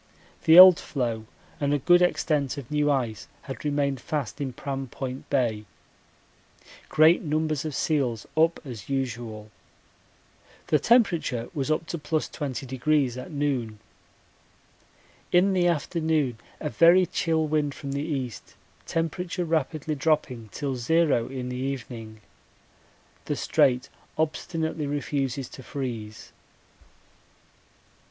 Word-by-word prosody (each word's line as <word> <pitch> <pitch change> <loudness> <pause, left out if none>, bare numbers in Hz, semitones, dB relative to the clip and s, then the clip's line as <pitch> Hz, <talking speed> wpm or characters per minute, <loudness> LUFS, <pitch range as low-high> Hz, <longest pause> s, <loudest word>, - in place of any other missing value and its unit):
The 160 +1 +7
old 185 -1 +11
floe 115 -5 -3 0.3
and 145 -1 +1
a - - +2
good 175 +6 +4
extent 155 -5 +1
of 135 -2 -8
new 150 0 +2
ice 120 -7 -1 0.2
had 135 - -7
remained 140 -3 0
fast 145 0 -4
in 135 -2 -2
Pram 135 +2 -5
Point 130 +1 -6
Bay. 115 -6 0 1.2
Great 155 +3 +5
numbers 155 -1 -1
of 155 -3 -4
seals 130 -9 0
up 165 +1 +3
as 120 -5 -8
usual. 120 -5 -4 1.2
The 150 - +4
temperature 170 - +2
was 145 -3 -2
up 155 +1 0
to 170 - -5
+20° 140 -3 -1
at - - -10
noon. 135 -7 -2 1.5
In 185 +2 +4
the 180 -2 +3
afternoon 155 -6 0 0.2
a 150 - -3
very 175 +2 +6
chill 165 -4 0
wind 150 -2 0
from 140 -2 -6
the 140 +1 -2
east, 135 -7 -5 0.3
temperature 175 +2 -2
rapidly 155 -1 -1
dropping 135 -6 -1
till 140 -3 -3
zero 135 -1 +2
in 130 -2 -5
the 125 - -4
evening. 120 -5 -5 1.0
The - - -1
Strait 125 0 +2 0.3
obstinately 160 0 -2
refuses 140 -2 -2
to - - -11
freeze. 115 -5 -6
145 Hz, 120 wpm, -26 LUFS, 125-160 Hz, 1.5 s, old